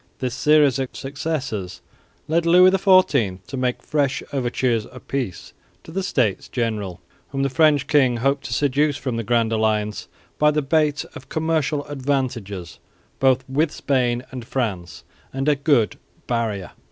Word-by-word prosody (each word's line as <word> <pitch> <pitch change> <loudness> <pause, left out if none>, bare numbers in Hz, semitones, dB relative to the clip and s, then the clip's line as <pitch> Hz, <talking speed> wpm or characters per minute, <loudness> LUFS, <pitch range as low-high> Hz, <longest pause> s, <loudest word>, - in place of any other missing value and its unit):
This 125 -3 -3
series 145 -1 +4
of 130 -1 -2
successes 135 - -4 0.5
led 170 +2 +1
Louis 180 +2 +7
XIV 185 - +3
to 135 - -7
make 125 -1 -1
fresh 140 -3 0
overtures 120 -3 0
of 125 0 -14
peace 125 -11 -4 0.3
to - - -11
the 190 +4 -2
States 125 - 0
General, 105 -7 -2 0.3
whom 135 -1 -2
the 140 - 0
French 150 -2 +4
king 130 -4 +3
hoped 135 +3 0
to 120 - -3
seduce 145 +1 +1
from 130 -5 -3
the 115 - -2
Grand 115 0 +1
Alliance 110 -1 0 0.3
by 150 - +5
the 150 0 0
bait 150 0 +1
of 130 - -11
commercial 155 -2 0
advantages 130 -10 -3 0.4
both 130 -1 +2
with 145 +4 +1
Spain 125 -5 0
and 130 -2 -6
France 95 -9 -3 0.3
and 135 +2 -3
a 150 - +4
good 140 -6 +1 0.3
"barrier." 110 -7 -2
130 Hz, 155 wpm, -22 LUFS, 115-145 Hz, 0.5 s, Louis